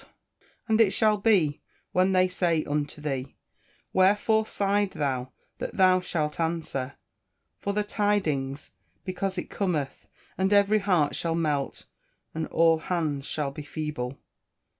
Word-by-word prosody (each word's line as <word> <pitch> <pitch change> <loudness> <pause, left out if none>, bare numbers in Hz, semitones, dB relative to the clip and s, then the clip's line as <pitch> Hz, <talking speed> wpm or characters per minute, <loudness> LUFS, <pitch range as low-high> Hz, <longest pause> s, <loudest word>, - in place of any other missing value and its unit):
[Verse: - - -24 0.6
"And 220 0 +4
it 200 -4 +4
shall 215 -2 +3
be, 195 -9 +2 0.3
when 185 +1 +3
they 185 0 +4
say 170 -3 0
unto 145 0 -2
thee, 135 -3 -3 0.6
Wherefore 210 +3 +3
sighed 200 0 0
thou 130 -3 -2 0.3
that - - -5
thou 185 -1 +5
shalt 155 -4 -2
answer, 160 -5 -2 0.6
For 200 - -2
the 210 +1 +1
tidings, 155 -11 -1 0.3
because 185 +1 -3
it 180 - -5
cometh; 160 -9 -2 0.3
and 190 +1 +2
every 205 +1 +5
heart 180 -8 +2
shall 165 -1 -1
melt, 150 -4 -1 0.5
and 160 0 -3
all 165 -1 +3
hands 155 -5 -2
shall 145 -3 -2
be 145 - -7
feeble." 145 -4 -4
170 Hz, 140 wpm, -27 LUFS, 150-195 Hz, 0.6 s, thou